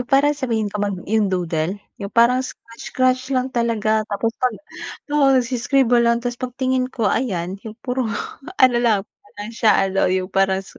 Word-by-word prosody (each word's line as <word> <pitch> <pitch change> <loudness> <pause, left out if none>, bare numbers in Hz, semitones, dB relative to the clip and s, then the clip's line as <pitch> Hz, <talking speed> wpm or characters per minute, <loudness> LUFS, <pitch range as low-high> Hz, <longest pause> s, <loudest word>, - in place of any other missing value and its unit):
yung 245 - -6
parang 290 +2 +4
sabihin 225 -6 -1
kong 210 0 -3
mag 200 -2 -2
yung 215 -2 +2
doodle? 175 -1 -1 0.2
Yung 200 0 -6
parang 240 +2 +5
scratch 230 -2 -10
scratch 255 0 +2
lang 255 +1 0
talaga. 220 -2 0
Tapos 215 +2 -1
pag 250 -3 0 0.6
oo 295 -2 +4
nag-i 250 -1 +1
scribble 245 -1 +3
lang 235 0 +2
tas 245 -1 -3
pag 250 -1 -5
tingin 260 -1 0
ko 230 -5 -1
ayan 190 -6 -2
yung 215 - -7
puro 250 -1 -1 0.5
ano 255 -2 +5
lang 225 -4 +3 0.3
parang 205 +2 -7
siya 225 -1 +3 0.2
ano 195 - +2
yung 185 +1 -1
parang 195 0 +1
su - - -16
235 Hz, 190 wpm, -21 LUFS, 205-255 Hz, 0.6 s, parang